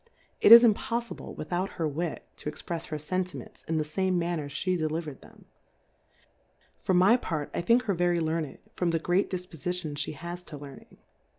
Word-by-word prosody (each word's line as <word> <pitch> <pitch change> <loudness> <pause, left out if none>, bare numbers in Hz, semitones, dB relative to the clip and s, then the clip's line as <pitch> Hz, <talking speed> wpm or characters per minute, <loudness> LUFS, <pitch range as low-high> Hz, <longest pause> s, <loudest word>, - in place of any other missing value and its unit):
It - - +6
is 235 +1 +13
impolTible 235 +1 0
without 180 +4 -3
her 165 -3 -1
Wit, 155 +2 -3
to - - -4
exprefs 165 +2 -5
her 155 - -3
Senti 180 +4 -2
ments, - - -12
in 160 - 0
the 155 - +1
fame 185 +4 0
manner 170 -4 -2
flie 185 +5 -1
deli. 155 -1 -1
verM 150 -5 -8
them: - - -17 1.3
For 185 - +1
my 190 +7 +6
part, 155 - -4
I - - -1
think 235 +7 +4
her 205 -4 0
very 175 -1 +2
Learned, 160 -3 -2 0.2
from 180 - 0
the 165 - +2
great 175 +4 +1
Difpofi 180 -2 -4
tion 170 -4 -4 0.2
ihe - - -9
has 175 +3 -6
to 150 - -8
Learning. 140 -1 -12
175 Hz, 190 wpm, -28 LUFS, 155-185 Hz, 1.3 s, is